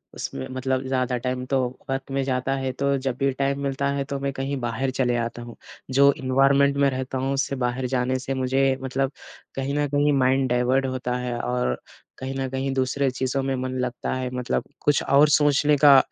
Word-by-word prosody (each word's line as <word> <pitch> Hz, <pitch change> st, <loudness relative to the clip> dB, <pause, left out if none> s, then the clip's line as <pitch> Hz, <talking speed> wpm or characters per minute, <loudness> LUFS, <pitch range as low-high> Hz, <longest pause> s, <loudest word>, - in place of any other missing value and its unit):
उसमें 65 Hz, -, -5 dB
मतलब 130 Hz, 0 st, -1 dB
ज़्यादा 130 Hz, -1 st, 0 dB
टाइम 125 Hz, +1 st, -3 dB
तो 135 Hz, 0 st, +1 dB, 0.3 s
वर्क 135 Hz, 0 st, -3 dB
में 135 Hz, 0 st, 0 dB
जाता 130 Hz, 0 st, -1 dB
है। 135 Hz, -1 st, -2 dB
तो 140 Hz, +2 st, 0 dB
जब 130 Hz, -2 st, -3 dB
भी 135 Hz, 0 st, +1 dB
टाइम 140 Hz, +1 st, -1 dB
मिलता 140 Hz, 0 st, -1 dB
है 140 Hz, -1 st, -1 dB
तो 140 Hz, 0 st, -4 dB
मैं 140 Hz, 0 st, -1 dB
कहीं 135 Hz, +1 st, -3 dB
बाहर 125 Hz, +3 st, -2 dB
चले 125 Hz, -2 st, +1 dB
आता 120 Hz, 0 st, -3 dB
हूँ 120 Hz, -1 st, -9 dB, 0.4 s
जो 140 Hz, +2 st, +6 dB
एनवायरनमेंट 135 Hz, +2 st, +3 dB
में 140 Hz, 0 st, +4 dB
रहता 130 Hz, 0 st, -3 dB
हूँ। 135 Hz, +1 st, -1 dB
उससे 140 Hz, 0 st, -1 dB
बाहर 125 Hz, 0 st, -1 dB
जाने 130 Hz, 0 st, 0 dB
से 135 Hz, +1 st, -3 dB
मुझे 135 Hz, +1 st, +1 dB
मतलब 135 Hz, +1 st, -1 dB, 0.4 s
कहीं 135 Hz, +1 st, -2 dB
न 145 Hz, 0 st, +1 dB
कहीं 145 Hz, +1 st, +2 dB
माइंड 130 Hz, 0 st, +2 dB
डाइवर्ट 125 Hz, +2 st, +2 dB
होता 125 Hz, -1 st, -2 dB
है। 125 Hz, -1 st, -3 dB
और 125 Hz, -, -1 dB, 0.4 s
कहीं 130 Hz, +1 st, -5 dB
न 130 Hz, -1 st, -2 dB
कहीं 135 Hz, +1 st, -2 dB
दूसरे 135 Hz, +1 st, +1 dB
चीज़ों 130 Hz, +1 st, -1 dB
में 135 Hz, 0 st, -1 dB
मन 130 Hz, 0 st, -3 dB
लगता 125 Hz, -1 st, -2 dB
है 130 Hz, -1 st, -2 dB
मतलब 125 Hz, -1 st, -1 dB, 0.2 s
कुछ 145 Hz, -1 st, +3 dB
और 145 Hz, +2 st, +5 dB
सोचने 145 Hz, 0 st, +4 dB
का 140 Hz, -2 st, +9 dB
130 Hz, 205 wpm, -24 LUFS, 130-135 Hz, 0.4 s, का